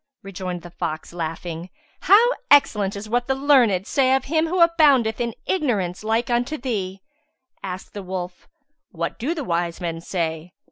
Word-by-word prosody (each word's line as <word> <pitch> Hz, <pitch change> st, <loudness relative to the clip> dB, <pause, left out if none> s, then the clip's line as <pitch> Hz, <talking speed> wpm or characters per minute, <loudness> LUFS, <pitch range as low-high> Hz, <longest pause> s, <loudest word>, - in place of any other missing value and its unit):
Rejoined 185 Hz, -2 st, -6 dB
the 175 Hz, -, -10 dB
fox, 160 Hz, -1 st, -5 dB
laughing, 165 Hz, +1 st, -5 dB, 0.3 s
"How 425 Hz, +7 st, +6 dB, 0.2 s
excellent 210 Hz, -8 st, +4 dB
is 200 Hz, +2 st, -7 dB
what 240 Hz, +2 st, 0 dB
the 265 Hz, -, +1 dB
learned 255 Hz, -9 st, +3 dB
say 265 Hz, +1 st, +3 dB
of 265 Hz, -, -1 dB
him 315 Hz, +3 st, +1 dB
who 360 Hz, +3 st, -1 dB
aboundeth 285 Hz, -10 st, +4 dB
in 235 Hz, -2 st, -2 dB
ignorance 210 Hz, -, -1 dB
like 225 Hz, +2 st, 0 dB
unto 245 Hz, +6 st, 0 dB
thee!" 195 Hz, -7 st, -4 dB, 0.6 s
Asked 185 Hz, 0 st, -7 dB
the 205 Hz, -, -6 dB
wolf, 180 Hz, -1 st, -6 dB, 0.4 s
"What 170 Hz, -3 st, -4 dB
do 300 Hz, +9 st, -1 dB
the 305 Hz, -, -3 dB
wise 170 Hz, -4 st, -2 dB
men 165 Hz, -2 st, -4 dB
say?" 165 Hz, -1 st, -3 dB
205 Hz, 160 wpm, -22 LUFS, 175-265 Hz, 0.6 s, How